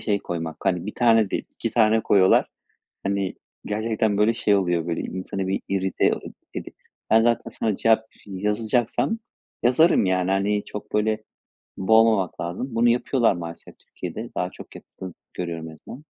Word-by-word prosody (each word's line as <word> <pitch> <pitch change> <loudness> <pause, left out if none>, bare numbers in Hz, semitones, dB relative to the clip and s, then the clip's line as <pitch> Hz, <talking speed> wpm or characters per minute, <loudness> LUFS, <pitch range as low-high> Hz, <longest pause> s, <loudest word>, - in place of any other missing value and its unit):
şey 105 -2 0
koymak, 80 -3 -5
hani, 90 -2 0
1 105 - -5
tane 115 -4 +4
değil - - -2
2 - - -4
tane 110 -1 +4
koyuyorlar, 95 -2 +4 0.6
hani, 100 -1 -1 0.3
gerçekten 110 0 0
böyle 110 +2 +4
şey 105 -2 +2
oluyor 85 -3 0
böyle 85 - -2
insanı 95 +1 -4
bir 95 - 0
irite 95 -1 +1
o - - -8 0.3
edi - - -6 0.4
ben 110 - +6
zaten 115 0 +1
sana 110 -2 -1
cevap 110 0 +3 0.2
yazacaksam 110 - 0 0.4
yazarım 125 - +4
yani, 90 0 +1
hani, 100 +2 +1
çok 105 - -9
böyle 110 0 +1 0.5
boğmamak 110 -1 +3
lazım. 90 +10 -4
Bunu 120 +1 +4
yapıyorlar 120 0 +3
maalesef 85 -1 -8
Türkiye'de. - - -7
Daha - - -1
çok - - -13
yapıldığını 95 -2 -10 0.2
görüyorum 85 -2 -4
en - - -12
azından. 130 - -12
105 Hz, 155 wpm, -24 LUFS, 95-115 Hz, 0.6 s, ben